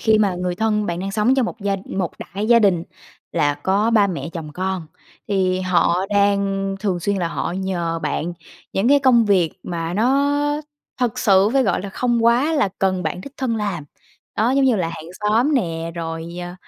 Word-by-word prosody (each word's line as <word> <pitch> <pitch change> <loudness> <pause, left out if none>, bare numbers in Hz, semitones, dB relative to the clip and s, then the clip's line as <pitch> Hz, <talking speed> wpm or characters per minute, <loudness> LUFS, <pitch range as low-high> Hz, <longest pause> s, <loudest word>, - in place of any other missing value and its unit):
khi 220 -1 +3
mà 200 -4 +2
người 180 0 -2
thân 210 0 0
bạn 170 0 -3
đang 195 +1 -3
sống 220 +5 +3
trong 260 -3 +2
một 225 - -7
gia 200 0 0
một 185 -3 -3
đại 200 +3 -5
gia 235 - +7
đình 195 -6 +3 0.5
là 145 -3 +2
có 195 +9 +1
ba 210 -3 +4
mẹ, 175 -3 -4
chồng 155 -3 -7
con 185 -1 -3 0.4
thì 185 -2 +1
họ 180 0 +2
đang 200 -1 +1
thường 190 -4 -1
xuyên 200 +2 0
là 175 -3 -1
họ 170 - -3
nhờ 175 -3 -2
bạn 155 +2 -2 0.4
những 195 +5 +1
cái 285 +1 +6
công 250 -4 +4
việc 185 -6 +3
mà 170 -1 -4
nó 275 +7 +2 0.6
thực 245 -4 0
sự 195 0 +4
phải 270 -1 +4
gọi 195 -5 0
là, 200 - -5
không 235 +3 0
quá 245 +7 +3
là 280 -10 +2
cần 185 -1 +1
bạn 160 +2 -3
đích 275 - -10
thân 245 -4 -1
làm, 195 -8 -3 0.5
đó 225 +3 +2
giống 270 +1 +3
như 255 -4 +3
là 175 -4 -1
hàng 165 -1 -8
xóm 230 +8 +2
nè, 165 -8 -1
rồi, 165 0 -5
ờ, 175 0 -6
195 Hz, 205 wpm, -21 LUFS, 175-225 Hz, 0.6 s, gia